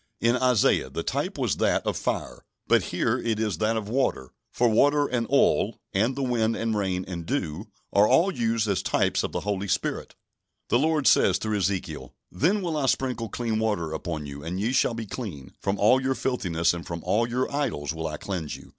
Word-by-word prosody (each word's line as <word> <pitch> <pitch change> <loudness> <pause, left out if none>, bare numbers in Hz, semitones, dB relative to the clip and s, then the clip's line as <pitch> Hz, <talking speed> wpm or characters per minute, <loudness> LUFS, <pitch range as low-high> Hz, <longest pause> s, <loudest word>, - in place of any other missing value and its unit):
In 115 +1 +3
Isaiah 125 -3 +3
the - - -4
type - - -2
was - - 0
that - - +1
of - - 0
fire, - - -3 0.2
but - - +3
here - - 0
it 115 -2 -1
is 105 -4 -1
that 110 +1 +1
of 105 -2 -4
water; 110 - -1 0.2
for 120 - +2
water 145 +6 +4
and 120 -4 -1
oil, - - +3 0.2
and 115 +7 +1
the 140 - -2
wind 115 -3 +1
and 115 -1 -1
rain 95 -3 -1
and 85 -2 -5
dew, 90 - -3 0.3
are 100 +1 +5
all 185 - +4
used 115 -3 0
as 95 -2 +1
types - - +1
of - - -3
the - - -3
Holy 100 -1 -2
Spirit. - - -2 0.5
The 120 - +3
Lord 155 -1 +1
says, 95 -6 +5
through 105 +1 -1
Ezekiel: 90 -5 -3 0.2
"Then 185 - +1
will 165 -3 -1
I 140 -3 0
sprinkle 125 -4 0
clean 115 0 -2
water 105 -8 -1
upon 80 -1 -4
you, 70 0 -8
and 85 +4 -4
ye 110 +5 0
shall 125 -2 +2
be 115 -1 -4
clean; 95 - -7
from 100 +1 -1
all 120 +6 +4
your 135 0 0
filthiness, 85 -12 0
and 85 -1 -5
from 85 -1 -6
all 115 +3 +1
your 125 +3 -1
idols, 105 - -1
will 80 0 -4
I 75 -1 -5
cleanse 85 -6 -4
you. - - -13
110 Hz, 210 wpm, -26 LUFS, 90-125 Hz, 0.5 s, are